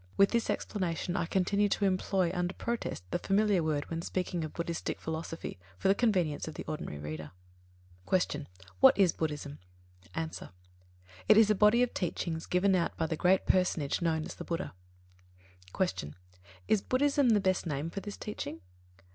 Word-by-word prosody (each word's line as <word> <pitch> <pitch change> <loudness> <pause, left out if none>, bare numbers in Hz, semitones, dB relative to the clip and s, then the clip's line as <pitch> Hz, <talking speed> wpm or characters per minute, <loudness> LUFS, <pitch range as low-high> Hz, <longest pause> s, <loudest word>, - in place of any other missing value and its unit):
With 195 - +5
this 235 -1 0
explanation, 180 -3 -2
I 170 - 0
continue 200 +3 +2
to 200 - +1
employ 185 -2 +1
under 180 0 -1
protest 235 - -3
the - - 0
familiar 200 0 +2
word 155 -2 -1
when 165 0 -2
speaking 180 -1 -2
of 155 - -5
Buddhistic 170 -1 -3
philosophy, 160 - -5 0.2
for 145 - +1
the - - +7
convenience 185 -11 +1
of 155 - -6
the - - -5
ordinary 150 - -5
reader. 75 +2 -6 0.8
2. 185 - +5
Q. 150 -4 -3 0.3
What - - +7
is 190 -5 +4
Buddhism? 150 -2 -4 0.6
A. 165 - -1 1.0
It 215 - +8
is 220 -1 +6
a - - +6
body 210 +4 +5
of 250 - -1
teachings 165 -2 -3
given 190 +2 +3
out 180 -2 0
by 165 - 0
the 160 - -1
great 185 +3 +3
personage 180 -5 +1
known 160 -2 0
as - - -6
the - - -8
Buddha. 170 +2 -3 1.0
3. 190 - +4
Q. 75 - -5 0.5
_Is 215 -2 +3
"Buddhism" 280 0 +2
the 215 -2 +5
best 185 -2 0
name 150 +2 -2
for 195 - -4
this 205 0 -7
teaching? 145 - -6
180 Hz, 175 wpm, -31 LUFS, 160-200 Hz, 1.0 s, It